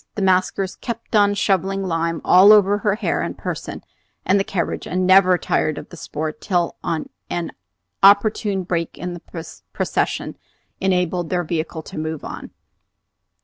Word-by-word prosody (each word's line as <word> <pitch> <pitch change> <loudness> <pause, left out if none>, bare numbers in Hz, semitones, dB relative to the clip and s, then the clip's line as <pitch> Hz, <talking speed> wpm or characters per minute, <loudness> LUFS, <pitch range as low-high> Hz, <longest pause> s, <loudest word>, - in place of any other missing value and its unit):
The 205 - -2
maskers 185 0 +1
kept 230 -1 -5
on 205 -1 +4
shovelling 195 0 0
lime 165 -2 -1
all 190 +3 +7
over 205 -1 +5
her 205 -1 +1
hair 225 - -1
and - - -4
person - - -6 0.4
and 195 +2 +3
the - - +2
carriage, 185 -3 -3
and 185 +1 -1
never 185 -1 +6
tired 155 -3 0
of - - -8
the - - -11
sport 155 -1 -5
till 175 -3 0
an 155 - -4 0.5
opportune 200 0 +4
break 170 -2 -3
in 180 0 -5
the 175 - -7 0.5
procession - - -2 0.4
enabled 180 -2 0
their 180 -1 0
vehicle 160 -1 -3
to - - -8
move 155 -1 -4
on. - - -7
185 Hz, 150 wpm, -21 LUFS, 170-195 Hz, 0.5 s, all